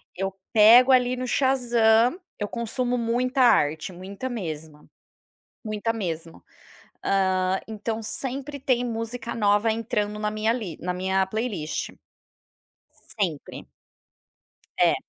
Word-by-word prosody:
eu 195 +1 -2 0.2
pego 230 +4 +8
ali 250 -1 +4
no 255 - -4
Shazam, 240 +1 +3 0.2
eu 205 - -3
consumo 245 +3 -2
muita 250 +3 0
arte, 160 -8 +3
muita 195 +7 -7
mesma 160 -9 -6 0.8
muita 215 +1 -2
mesmo. 165 -6 -5 0.6
Hã, 190 -1 +2
então 220 +1 -4
sempre 275 +5 -4
tem 250 -2 +1
música 230 0 -4
nova 210 +1 +2
entrando 210 -2 -2
na 210 0 -1
li 215 -4 -2
na 180 +1 -2
minha 190 +1 0
playlist, 190 -7 -3 1.3
sempre. 170 -8 -3 1.1
É. - - +5
220 Hz, 105 wpm, -25 LUFS, 190-245 Hz, 1.3 s, pego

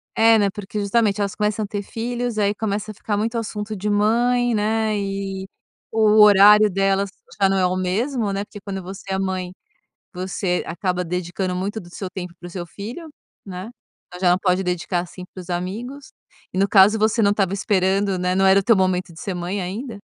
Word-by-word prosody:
É, 225 0 +6
né, 200 -1 +3
porque 210 0 -6
justamente 205 0 +1
elas 200 -1 -2
começam 210 0 0
a - - -4
ter 205 0 -3
filhos 240 +2 -3
aí 205 0 +2
começa 215 0 -3
a - - -10
ficar 205 0 -3
muito 225 +3 -1
assunto 215 -1 -4
de 210 +2 -3
mãe, 240 +4 +2
né, 215 0 0
e 195 -1 -4 0.4
o 215 -1 +5
horário 210 +1 +8
delas 195 +1 +1 0.3
já 195 - +6
não 195 - +1
é 185 - +3
o 180 0 0
mesmo, 210 +5 -1
né, 200 +1 -2
porque 205 - -11
quando 195 -1 -5
você 190 +1 -9
é 190 - 0
mãe, 185 -1 -3 0.6
você 180 0 -2
acaba 180 0 -2
dedicando 180 +1 -3
muito 200 +4 -3
do 175 - -12
seu 185 +1 -6
tempo 180 -2 -7
para 175 - -9
o - - -9
seu 175 0 -6
filho, 230 - -8 0.4
né, 190 +2 -7 0.5
ela 180 -1 +4
pode 185 -1 +1
dedicar 180 0 -1
assim 180 +1 -10
para 185 - -8
os 180 - -14
amigos, 225 +11 -5 0.4
e - - -4
no 195 +1 +3
caso 200 +2 +6
você 220 +2 +2
não 200 -1 +4
estava 195 -2 0
esperando, 195 0 +1
né, 180 0 0
não 195 0 +3
era 190 +1 +6
o - - -3
teu 230 - +5
momento 185 -2 0
de 160 - -13
ser 195 - -3
mãe 180 +3 -3
ainda. 210 +5 -5
200 Hz, 205 wpm, -22 LUFS, 185-215 Hz, 0.6 s, horário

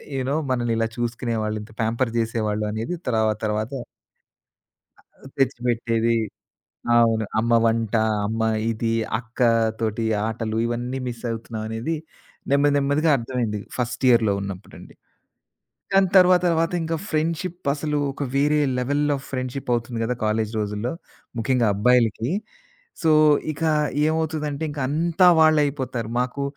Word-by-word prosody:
You 130 - -1
know 145 - 0 0.2
మనల్నిలా 115 -2 0
చూసుకునేవాళ్ళు, 115 -3 -2
ఇంత 110 - -14
pamper 115 +2 0
చేసేవాళ్ళు 110 -2 -1
అనేది 115 +11 -3
తర్వాతర్వాత 110 0 0 1.3
ఆహ్, - - -18
తెచ్చిపెట్టేది. 115 -3 +1 0.8
అవును. 115 -2 +3
అమ్మ 115 +2 +1
వంట, 115 -1 +1 0.3
అమ్మ 110 +1 -3 0.3
ఇది, 115 0 -1 0.3
అక్కతోటి 115 -2 0 0.2
ఆటలు 110 0 -3
ఇవన్నీ 120 +2 -3
మిస్ 120 -1 -7
అవుతున్నాం 115 -1 -5
అనేది 115 +9 -3 0.6
నెమ్మది 140 +1 +4
నెమ్మదిగా 145 +3 +2
అర్థమైంది. 115 -3 -2 0.2
ఫస్ట్ 125 +1 -3
ఇయర్‌లో 115 -4 +4
ఉన్నప్పుడండి. 100 -1 -8 1.0
దాని 195 0 +5
తర్వాత, 180 -1 +6
తర్వాత 165 0 +1
ఇంకా 165 0 -1
ఫ్రెండ్‌షిప్ 165 +2 -2
అసలు 150 0 -2
ఒక 140 - -5
వేరే 150 +2 +3 0.2
లెవెల్ 145 +4 0
ఆఫ్ 135 - -8
ఫ్రెండ్‌షిప్ 130 0 -4
అవుతుంది 120 0 -2
కదా 120 +2 0
కాలేజి 110 0 0
రోజుల్లో. 105 +3 -2 0.5
ముఖ్యంగా 120 0 +2
అబ్బాయిలకి. 115 +1 +2 0.7
సో, 160 - +3 0.4
ఇకా 160 +2 0 0.4
ఏమవుతదంటే 155 -2 -2
ఇంక 145 -1 -6
అంతా 170 +5 +3
వాళ్లే 155 -1 +5
అయిపోతారు. 130 -5 -4
మాకు 125 +3 -2
120 Hz, 120 wpm, -23 LUFS, 115-145 Hz, 1.3 s, తర్వాత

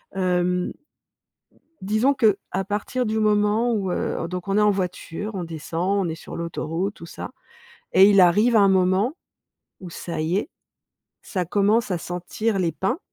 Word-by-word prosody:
hem 180 -1 0 1.1
disons 215 +8 +2
qu'à 195 -4 +1
partir 230 +5 -2
du 220 +1 -1
moment, 215 +2 +2
où, 195 -4 -1
heu, 165 - -2
donc 180 +2 -6
on 195 +2 +2
est - - +4
en 210 0 +5
voiture, 190 +2 -4
on 180 - -3
descend, 170 +4 -2
on - - -2
est - - -3
sur 165 - -9
l'autoroute, 170 +3 -3
tout 170 - -11
ça - - -8 0.6
et 195 +2 +7
il 195 -2 +6
arrive 210 +7 +4
un 200 -2 +6
moment, 190 - +2 0.7
où, 180 -2 -9
ça 170 -1 -5
y 160 +4 0
est, 280 - -4 0.7
ça 185 -3 -3
commence 205 +6 +2
à 175 - 0
sentir 185 +5 -3
les 170 -3 +1
pins 245 - -1
195 Hz, 165 wpm, -23 LUFS, 180-210 Hz, 1.1 s, et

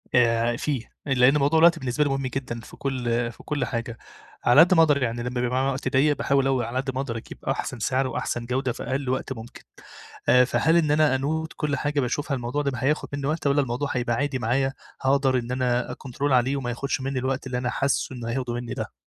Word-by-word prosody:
آآ، 115 -1 +3
فيه 135 -5 -3 0.2
لأن 135 +1 +4
موضوع 145 +3 +3
الوقت 170 0 +6
بالنسبة 130 +2 0
لي 145 - 0
مهم 135 -1 -1
جدًا 125 -2 -4
في - - -13
كل 120 -3 -1
في - - -16
كل 150 -2 -1
حاجة 115 -1 -4 0.5
على 120 +5 +6
قد 180 +2 +6
ما 165 - +6
أقدر 145 -3 +3
يعني 120 0 -2
لما 125 0 -2
بيبقى 125 - 0
معايا 135 +1 +1
وقت 135 0 -4
ضيق 145 +2 +3
باحاول 135 -1 +2
أو 130 -2 +2
على 120 +2 -3
قد 135 0 -2
ما 130 - 0
أقدر 120 -5 -4
أجيب 115 - -9
أحسن 125 - -2
سعر 130 +4 +1
وأحسن 120 -1 -3
جودة 125 +1 -1
في 120 - -7
أقل 130 +1 -2
وقت 130 +1 -2
ممكن، 115 0 -11 0.8
فهل 160 +6 +2
إن 155 -3 +2
أنا 150 -2 +4
أنوت 160 +4 -2
كل 150 -2 0
حاجة 145 0 -1
باشوفها 140 +3 -1
الموضوع 125 +4 -2
ده 140 - 0
هياخد 140 +5 0
مني 140 -1 -3
وقت، 155 -1 -1
والّا 140 +1 +3
الموضوع 130 +2 -2
هيبقى 120 -2 0
عادي 140 +1 -1
معايا 135 +4 0 0.3
هأقدر 135 -1 +2
إن 120 0 -6
أنا 125 -1 0
أكنترول 135 +2 -2
عليه 130 +2 +3
وما 125 -3 -3
يخدش 135 +3 -2
مني 135 0 -2
الوقت 130 +1 -2
اللي 125 - -2
أنا 125 0 -1
حاسه 135 0 -1
إنه 120 -2 -5
هياخده 125 0 -2
مني 120 0 -4
ده؟ - - -5
130 Hz, 225 wpm, -25 LUFS, 120-140 Hz, 0.8 s, الوقت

